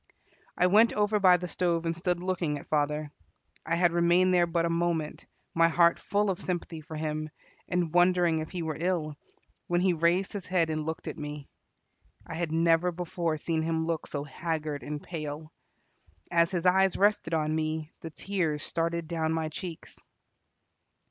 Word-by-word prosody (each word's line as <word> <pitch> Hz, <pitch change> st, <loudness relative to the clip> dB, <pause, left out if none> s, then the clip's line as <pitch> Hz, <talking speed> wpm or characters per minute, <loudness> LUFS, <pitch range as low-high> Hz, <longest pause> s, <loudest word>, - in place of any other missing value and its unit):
I -, -, +4 dB
went 215 Hz, +5 st, +5 dB
over 210 Hz, 0 st, +1 dB
by 185 Hz, -2 st, +6 dB
the 180 Hz, +1 st, -5 dB
stove 170 Hz, -1 st, 0 dB
and 165 Hz, 0 st, -1 dB
stood 175 Hz, +1 st, -1 dB
looking 175 Hz, -5 st, -1 dB
at -, -, -11 dB
father. 150 Hz, 0 st, 0 dB, 0.5 s
I 165 Hz, -, 0 dB
had 175 Hz, 0 st, +3 dB
remained 175 Hz, +2 st, +3 dB
there 175 Hz, -1 st, +4 dB
but 170 Hz, 0 st, 0 dB
a -, -, 0 dB
moment, 165 Hz, -2 st, -1 dB, 0.3 s
my 165 Hz, 0 st, +5 dB
heart 170 Hz, 0 st, +4 dB
full 205 Hz, 0 st, 0 dB
of 180 Hz, -, -5 dB
sympathy 175 Hz, -3 st, -4 dB
for 155 Hz, +1 st, -9 dB
him, 155 Hz, 0 st, -3 dB, 0.4 s
and 175 Hz, -3 st, 0 dB
wondering 175 Hz, -2 st, +4 dB
if 155 Hz, -, -5 dB
he 180 Hz, -2 st, -4 dB
were 155 Hz, -2 st, -3 dB
ill, 165 Hz, -4 st, -1 dB, 0.5 s
when 175 Hz, 0 st, +1 dB
he 180 Hz, 0 st, +3 dB
raised 170 Hz, +5 st, +1 dB
his 200 Hz, -3 st, -6 dB
head 170 Hz, -3 st, +1 dB
and 155 Hz, 0 st, -3 dB
looked 160 Hz, -, -4 dB
at -, -, -5 dB
me. 150 Hz, -1 st, -6 dB, 0.8 s
I -, -, -7 dB
had 165 Hz, -1 st, -2 dB
never 165 Hz, +2 st, +3 dB
before 170 Hz, -2 st, -2 dB
seen 160 Hz, +1 st, -1 dB
him 160 Hz, 0 st, -1 dB
look 165 Hz, -1 st, -2 dB
so 145 Hz, -1 st, -4 dB
haggard 150 Hz, 0 st, -3 dB
and 150 Hz, 0 st, -6 dB
pale. 155 Hz, -2 st, -6 dB, 0.8 s
As 170 Hz, -1 st, +4 dB
his 180 Hz, -2 st, -2 dB
eyes 190 Hz, +1 st, +4 dB
rested 200 Hz, -5 st, +2 dB
on 155 Hz, -1 st, 0 dB
me, 155 Hz, 0 st, -2 dB
the 165 Hz, -, -6 dB
tears 160 Hz, -3 st, -2 dB
started 165 Hz, 0 st, -1 dB
down 160 Hz, -1 st, -1 dB
my 160 Hz, -1 st, -1 dB
cheeks. 165 Hz, +1 st, -8 dB
165 Hz, 180 wpm, -28 LUFS, 155-180 Hz, 0.8 s, by